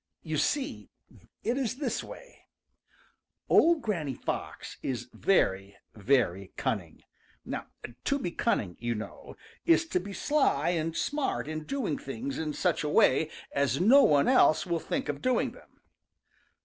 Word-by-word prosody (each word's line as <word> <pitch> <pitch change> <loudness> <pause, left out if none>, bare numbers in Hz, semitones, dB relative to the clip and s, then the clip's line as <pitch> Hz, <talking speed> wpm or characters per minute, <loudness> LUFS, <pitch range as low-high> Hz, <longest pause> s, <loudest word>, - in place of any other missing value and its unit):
You 155 -2 -2
see, 280 - -1 0.5
it 245 +4 0
is 245 -3 -1
this 285 +2 -2
way: - - -13 1.0
Old 330 -4 +5
Granny 165 - -2
Fox - - -5
is 125 -2 -3
very, 100 - +1 0.2
very 100 -5 +1
cunning. - - -3 1.0
To 280 - +2
be 180 -11 -3
cunning, 100 - -1
you 120 0 -2
know, 110 - -8 0.3
is 335 0 +4
to - - +1
be 195 +2 -7
sly 270 - +1
and 165 -2 -1
smart 290 - -1
in 155 0 -5
doing 240 - -2
things 135 +1 -5
in 155 -2 -2
such 180 -1 0
a 150 - -1
way 150 +1 +4 0.2
as 140 -1 +1
no 245 +10 +7
one 145 - +4
else 250 -11 +5
will 170 -2 -1
think 270 - -3
of - - -3
doing 255 -1 +1
them. - - -19
160 Hz, 145 wpm, -29 LUFS, -, 1.0 s, no